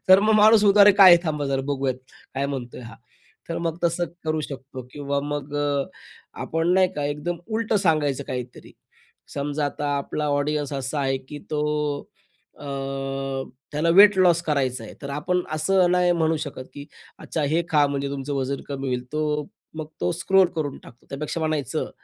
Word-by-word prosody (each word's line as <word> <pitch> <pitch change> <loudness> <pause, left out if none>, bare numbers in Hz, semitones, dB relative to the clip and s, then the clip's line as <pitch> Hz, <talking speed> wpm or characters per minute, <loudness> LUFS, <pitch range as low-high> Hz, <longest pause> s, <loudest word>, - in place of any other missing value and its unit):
तर 190 +1 +8
मग 215 +2 +3
माणूस 215 0 +6
म्हणतो, 205 0 +5
"अरे 205 0 +9
काय, 190 -3 +9
थांबा, 150 -2 -1
जरा 135 -1 0
बघूयात 135 -2 0 0.4
काय 135 +1 -1
म्हणतोय 130 -3 -5
हा". 115 -2 -10 0.5
तर 165 - -2
मग 165 -1 -2
तसं 170 +1 +1 0.2
करू 155 0 0
शकतो. 135 -2 -7
किंवा 140 -1 -2
मग 145 0 -4
अ, 145 -1 0 0.6
आपण 165 +1 -1
नाही 185 -1 +4
का, 145 -5 -3
एकदम 150 +4 -2
उलटं 220 -1 0
सांगायचं 155 -8 +1
काहीतरी. 125 -1 -7 0.6
समजा 145 +1 -2
आता 145 +1 -3
आपला 145 +2 -3
ऑडियन्स 145 0 -1
असा 135 +2 -2
आहे, 135 -1 +1
की 140 +3 -10
तो 150 -1 -1 1.0
अ, - - -11 1.1
त्याला 155 +3 0
व्हेट 205 +1 +8
लॉस 175 -2 +5
करायचं 135 -7 -1
आहे, - - -10
तर 140 - -5
आपण 180 +6 -1
असं 175 +4 +2
नाही 180 0 +3
म्हणू 160 -1 +1
शकत, 140 -3 -7
की 145 0 -9 0.3
"अच्छा 160 - -3
हे 155 +4 +1
खा, 150 -4 +4
म्हणजे 140 0 -2
तुमचं 140 +1 -4
वजन 135 0 -2
कमी 140 -1 -4
होईल." 125 -1 -1
तो 155 0 -1 0.6
मग 155 - -4
तो 90 0 +1
स्क्रोल 190 -1 +4
करून 150 -4 -3
टाकतो. 120 -2 -17
त्यापेक्षा 150 +4 -4
म्हणायचं, 155 -2 -2
150 Hz, 175 wpm, -24 LUFS, 140-170 Hz, 1.1 s, अरे